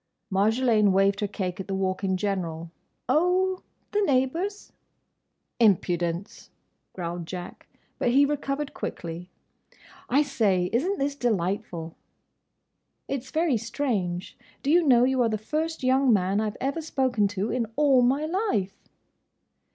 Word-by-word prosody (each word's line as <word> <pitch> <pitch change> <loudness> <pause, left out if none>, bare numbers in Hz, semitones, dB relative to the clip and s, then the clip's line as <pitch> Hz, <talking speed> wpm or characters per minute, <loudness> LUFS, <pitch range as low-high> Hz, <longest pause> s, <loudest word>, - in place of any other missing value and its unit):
Marjolaine 215 +1 +3
waved 195 +1 +3
her 205 - 0
cake 190 -3 -4
at 190 - -5
the 195 - -2
Walk 190 0 -1
in 190 -1 +1
general. 170 -4 -3 0.4
"Oh—the 370 +4 0
neighbours." 330 +6 0 0.9
"Impudence!" 175 -3 +1 0.4
growled 170 -2 -5
Jack. 180 0 -8 0.3
But - - +1
he 275 +4 +5
recovered 285 0 -2
quickly. 170 +1 -6 0.8
"I 280 +4 +4
say! 200 -10 +1
Isn't 350 +12 +1
this 280 +1 -1
delightful?" 185 - -2 1.1
"It's 265 -2 -4
very 315 -5 +1
strange. 215 -6 -3 0.2
Do 280 - +1
you 350 +2 +6
know, 250 -7 +5
you 260 0 +2
are 235 - +3
the 215 - -1
first 310 +8 -3
young 260 0 +3
man 195 0 +2
I 215 - 0
've 210 - -10
ever 275 +5 -2
spoken 260 -8 +1
to, 200 +4 -1
in 240 -3 -1
all 280 -4 +4
my 270 +5 +2
life?" 315 - -1
230 Hz, 135 wpm, -26 LUFS, 190-280 Hz, 1.1 s, you